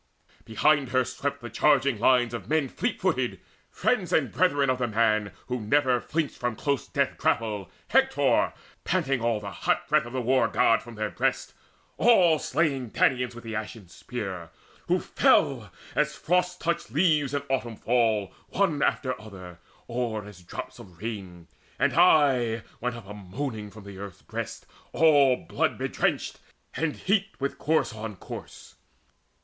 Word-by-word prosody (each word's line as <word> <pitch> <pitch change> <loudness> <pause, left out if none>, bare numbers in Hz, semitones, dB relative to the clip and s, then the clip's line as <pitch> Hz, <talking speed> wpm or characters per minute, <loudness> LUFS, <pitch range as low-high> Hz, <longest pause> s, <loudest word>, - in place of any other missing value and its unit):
Behind 135 +5 +2
her 130 0 +2
swept 140 +3 -4
The 120 - -7
charging 140 -2 +3
lines 120 0 +3
of 115 -2 -6
men 155 -4 +1
fleet - - -2
footed, - - 0 0.3
friends - - 0
And - - +2
brethren 145 -6 +2
of 130 0 +1
the 120 - 0
man 110 -2 +1
who 125 -1 -3
never 130 +2 +2
flinched 160 -2 -2
From 120 -2 -1
close 140 +3 -1
death - - -1
grapple, 105 -5 0 0.2
Hector, - - +3 0.3
panting 135 -2 0
all 115 -2 +1
The 100 -1 -7
hot - - -1
breath - - +2
of 120 - -10
the 130 - -1
War 125 -1 +3
god 115 +1 +3
from 120 0 -11
their 110 -1 -3
breasts, - - -1 0.4
All 180 -9 +5
slaying 140 -8 0
Danaans 125 +1 +1
with 120 - -10
the 115 -1 -6
ashen 105 -3 -6
spear, 95 -5 -6 0.4
Who - - +2
fell - - +2 0.2
as - - +1
frost 180 +2 0
touched 170 -1 -2
leaves 150 0 +2
in 140 - -1
autumn 125 -4 -2
fall 110 -4 +1 0.2
One 175 -8 +1
after 130 -5 0
other, 90 -5 -11 0.3
or 115 -3 -2
as 105 -3 -12
drops 85 - -8
of 90 -3 -13
rain. 95 -6 -6 0.3
And - - +2
aye 135 -10 +4 0.2
went 125 +1 -2
up 120 -5 -10
a 105 - -7
moaning 105 +2 -5
from 100 0 -13
earth's 100 -1 -9
breast - - -6 0.3
All 145 -5 +5
blood - - -1
bedrenched, - - -1 0.4
and 160 -2 -1
heaped 195 0 -1
with 140 0 -3
corse 155 -6 +1
on 110 -1 -6
corse. - - -10
120 Hz, 160 wpm, -27 LUFS, 110-145 Hz, 0.4 s, All